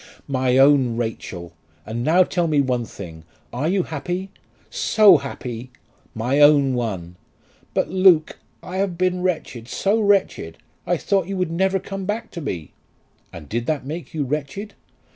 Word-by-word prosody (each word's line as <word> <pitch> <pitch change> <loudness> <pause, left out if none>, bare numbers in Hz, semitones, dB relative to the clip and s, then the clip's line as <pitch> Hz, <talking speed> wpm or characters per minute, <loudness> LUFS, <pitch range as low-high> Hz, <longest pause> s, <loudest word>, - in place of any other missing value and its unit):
"My 130 -2 +1
own 135 -4 +5
Rachel! 100 -7 -5 0.3
And 115 +2 -4
now 170 +6 +5
tell 175 -1 -1
me 150 -2 +2
one 125 -3 0
thing: 85 -7 -10 0.3
are 135 +6 -1
you 190 0 +1
happy?" 180 +5 -4 0.4
"So 205 -5 +5
happy!" 130 -3 -6 0.5
"My 125 +6 0
own 145 -2 +6
one!" 95 -8 -4 0.6
"But, - - +1
Luke, 185 -4 +4 0.2
I 185 - -6
have 190 -3 -1
been 180 0 0
wretched; 155 -10 -3
so 200 - 0
wretched! 195 - +1 0.3
I - - +2
thought 195 -3 0
you 195 0 -3
would 180 -3 -1
never 190 +3 +1
come 195 0 -6
back 225 +3 -3
to 170 - -6
me." 90 - -5 0.6
"And 80 -4 -10
did 120 +6 -3
that 150 -4 -1
make 160 +4 -6
you 155 -2 -2
wretched?" 150 +9 -4
150 Hz, 160 wpm, -22 LUFS, 120-185 Hz, 0.6 s, own